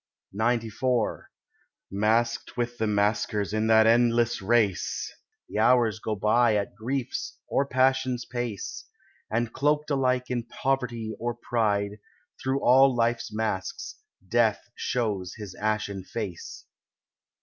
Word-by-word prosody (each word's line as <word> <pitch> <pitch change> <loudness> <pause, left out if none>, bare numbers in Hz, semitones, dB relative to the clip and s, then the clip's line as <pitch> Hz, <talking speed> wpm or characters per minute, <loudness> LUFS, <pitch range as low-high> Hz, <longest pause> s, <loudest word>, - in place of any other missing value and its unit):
XCIV 115 +1 0 0.7
Masqued 110 +6 0
with 120 0 -2
the 110 - +1
masquers 105 0 0
in 110 +1 +1
that 110 0 +6
endless 120 0 +3
race 105 -2 +1 0.3
The - - -3
hours 115 -1 +4
go 110 -1 -2
by 110 +3 +3
at 100 -1 -1
grief's 120 +4 -4
or 140 - +1
passion's 130 -2 +1
pace, 120 -5 -5 0.4
And 115 +1 -1
cloaked 150 +1 +1
alike 130 -2 +1
in 120 -2 -1
poverty 120 -3 -2
or 120 0 -2
pride, 105 -4 -1 0.4
Through 135 +1 0
all 130 +1 +6
life's 115 0 0
masks 105 -3 -3 0.3
death 115 +1 +1
shows 105 -9 -2
his 105 -4 -8
ashen 105 -2 -2
face. 95 -3 -6
115 Hz, 115 wpm, -27 LUFS, 105-125 Hz, 0.7 s, that